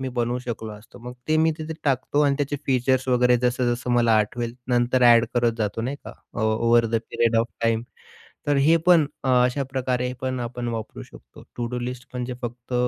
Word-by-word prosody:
मी 130 - -3
बनवू 120 +1 0
शकलो 115 -3 -6
असतो. 105 +3 -14
मग 125 +1 -8 0.2
ते 155 - +3
मी 160 +1 +4
तिथे 160 +1 -5
टाकतो 140 +1 +1
आणि 140 -1 +3
त्याचे 145 0 -1
फीचर्स 130 0 +1
वगैरे 125 0 +4
जसं 125 0 +1
जसं 125 +1 -5
मला 120 -2 +3
आठवेल 115 +3 -2
नंतर 125 +1 +2
ॲड 120 -1 +7
करत 120 -1 +2
जातो 110 +1 -2
नाही 135 +4 -3
का. - - -7 0.2
अ, - - -3
over 115 +2 +3
the 115 - -4 0.2
period 115 -1 +1
of 115 +1 +2 0.2
time. 115 0 +1 0.7
तर 145 - +3
हे 155 +4 +5
पण 165 -4 +6 0.2
अ, 130 - 0 0.2
अशा 130 +3 -1
प्रकारे 125 -1 -1
पण 130 -1 -2
आपण 120 0 -4
वापरू 110 - -6
शकतो. - - -16
टू-डू 120 +1 -3
लिस्ट 125 +2 -6
म्हणजे 125 0 -4
फक्त 120 +1 -6
125 Hz, 200 wpm, -24 LUFS, 115-130 Hz, 0.7 s, ॲड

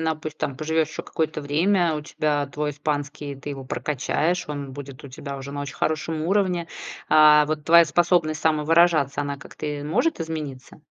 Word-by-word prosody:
напус 155 -1 -2
там 140 -3 -3
поживешь 160 0 0
еще 160 - -6
какое-то 155 -1 -2
время, 165 +4 +2
у 150 - -3
тебя 150 -1 -1
твой 150 +2 -3
испанский, 145 -1 -4
ты 145 +2 -7
его 135 -1 -6
прокачаешь, 150 +7 -1
он 140 -2 -5
будет 140 0 -9
у - - -8
тебя 140 +2 -7
уже 135 +1 -7
на 145 - -4
очень 140 -1 -6
хорошем 155 0 -1
уровне, 180 -1 +1 0.4
а, 150 -1 +7
вот 155 0 -3
твоя 170 +1 +7
способность 165 -1 +2
самовыражаться, 155 -2 +3
она 140 -1 -3
как-то, 145 +2 -9
э, 145 -1 -4
может 245 - +1
измениться? 155 -4 -6
150 Hz, 175 wpm, -24 LUFS, 145-160 Hz, 0.4 s, а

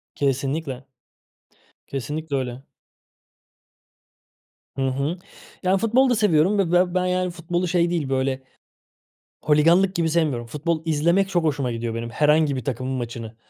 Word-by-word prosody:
Kesinlikle. 135 0 -2 1.0
Kesinlikle 145 +2 -4
öyle. 130 0 -3 2.1
Hı 135 - -3
hı. 140 +7 -1 0.5
Yani, 185 +1 +3
futbol 240 +5 +3
da 245 - +3
seviyorum 200 -2 +3
ve 180 -4 +1
be 180 0 +3
ben, 185 - +2
yani, 180 0 0
futbolu 175 +1 -2
şey 170 0 +2
değil, 165 -6 -1
böyle, 130 0 -1 1.0
holiganlık 170 +6 +4
gibi 170 -2 +1
sevmiyorum. 150 -8 0
Futbol 155 +5 -2
izlemek 170 +5 +2
çok 175 -4 0
hoşuma 140 -5 0
gidiyor 115 0 -3
benim, 115 0 -4
herhangi 150 +1 +3
bir 130 - -5
takımın 130 -1 -3
maçını. 115 -3 -5
155 Hz, 135 wpm, -23 LUFS, 135-175 Hz, 2.1 s, holiganlık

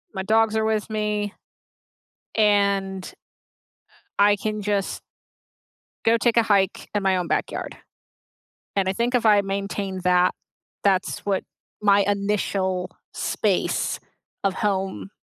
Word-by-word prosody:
my 190 - -2
dogs 220 +2 +3
are 220 - +1
with 220 -1 0
me 210 -1 -1 1.0
and, 200 -3 +2
uh, - - -10 1.0
I 205 0 +5
can 215 +1 -3
just 200 -1 -1 1.0
Go 230 +1 +5
take 235 0 +1
a 230 - +6
hike 200 -3 +1
in 205 - +1
my 190 -1 +3
own 180 -1 -2
backyard. - - -2 1.0
And 195 -2 +1
I 190 - +1
think 235 +5 0
if 240 - +1
I 210 -2 +6
maintain 195 -1 -3
that, 180 0 +4 0.5
that's 190 -2 +1
what 195 -2 -1 0.4
my 205 -1 +5
initial 195 -2 -1 0.2
space - - 0 0.4
of 195 -1 +2
home 195 -1 -2
200 Hz, 125 wpm, -24 LUFS, 190-210 Hz, 1.0 s, a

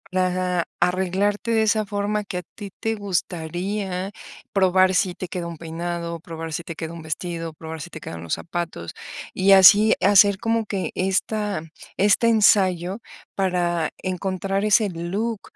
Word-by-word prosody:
Ajá. 180 -1 +1 0.2
Arreglarte 190 +5 0
de 220 -1 +3
esa 215 0 +2
forma 205 +1 -1
que 195 -3 -5
a - - -2
ti 205 -2 -7
te 225 0 -1
gustaría 185 0 -3 0.4
probar 185 -1 +4
si 180 -1 +1
te 185 - -6
queda 175 -1 -4
un 170 -1 -7
peinado, 170 +1 -5
probar 165 -1 -7
si 170 +2 -3
te 165 0 -7
queda 160 +1 -6
un 170 - -8
vestido, 165 +1 -4
probar 160 0 -8
si 175 - -7
te 160 - -9
quedan 85 - -8
los 85 - -1
zapatos, 170 - -5 0.4
y 190 +1 +3
así 200 +3 +8
hacer 200 0 +5
como 225 +1 0
que 195 -2 -3
esta 200 +1 -1 0.4
este 205 +3 +4
ensayo 195 -3 +3 0.4
para 175 -4 0
encontrar 190 +1 -2
ese 215 0 +4
look 195 +6 -3
185 Hz, 155 wpm, -23 LUFS, 170-205 Hz, 0.4 s, así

